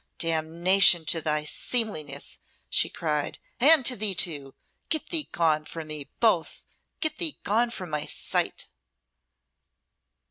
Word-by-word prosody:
"Damnation 165 +2 +3
to 165 +1 +1
thy 150 -1 -1
seemliness!" 155 - -2 0.3
she - - +3
cried, 150 -3 -3 0.2
"and 285 +1 +6
to 255 - +4
thee 205 -3 0
too! 145 -6 0 0.3
Get 315 -2 -1
thee 320 -4 -1
gone 155 -2 +1
from 160 0 -9
me, 150 -2 -6
both 215 -8 0 0.4
get 315 - 0
thee 330 -5 -1
gone 230 +4 +1
from 185 -8 -7
my 150 -1 -3
sight!" - - -1
170 Hz, 130 wpm, -25 LUFS, 155-230 Hz, 0.4 s, and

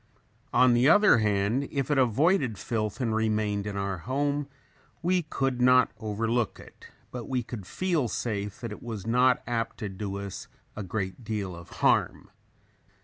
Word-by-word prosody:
On 125 0 +5
the 120 +4 +4
other 205 - +6
hand, 105 +5 +1
if 140 0 -1
it 145 - +3
avoided 130 - +2
filth 110 +3 -3
and 115 -4 0
remained 105 -2 0
in 100 -1 -4
our 100 -2 -2
home 140 - -1 0.6
we 180 +1 +2
could 135 -5 -2
not 125 0 +5
overlook 110 +1 -1
it, - - -14 0.2
but 120 -2 -6
we 130 -2 0
could 110 -5 -8
feel 170 - 0
safe 105 -3 -3
that 115 -3 -5
it 105 - -8
was 110 -5 -6
not 125 +2 +3
apt 115 -1 -2
to 105 - -4
do 100 +1 -5
us 100 -1 -6 0.3
a 110 - -5
great 95 +3 -4
deal 105 -5 -3
of 85 0 -12 0.2
harm. - - +2
115 Hz, 165 wpm, -27 LUFS, 105-130 Hz, 0.6 s, other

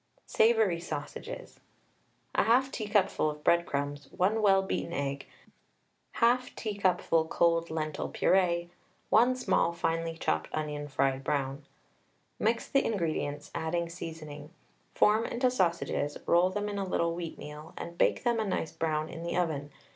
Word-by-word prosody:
SAVOURY 220 -6 +3
SAUSAGES. 170 - -7 0.7
1/2 255 +4 +3
teacupful 205 -7 +1
of 150 0 -7
breadcrumbs, 145 -4 +1
1 210 +5 +1
well 195 -2 +5
beaten 170 -2 -3
egg, 140 -2 -3 0.9
1/2 245 +2 +2
teacupful 190 -6 +1
cold 170 0 +2
lentil 155 -1 -3
purée 175 -2 +2 0.4
1 245 +4 +5
small 250 -8 +2
finely 165 -1 -2
chopped 80 - -1
onion 150 -1 -3
tried 135 -1 0
brown. 140 0 -1 0.8
Mix 225 +2 +1
the 275 - +2
ingredients, 160 -7 -2
adding 170 +1 -1
seasoning. 155 -3 -8 0.5
Form 215 +2 +4
into 250 +2 +1
sausages, 170 - 0
roll 175 +2 +4
them 205 +2 -2
in 205 -1 -3
a - - 0
little 170 -3 0
wheatmeal, 155 -2 -7
and 170 - -6
bake - - +2
them 240 -2 +2
a - - +1
nice 185 -5 -2
brown 155 -1 -1
in 165 - -8
the 170 +1 -2
oven. 155 -5 -1
170 Hz, 135 wpm, -30 LUFS, 155-205 Hz, 0.9 s, well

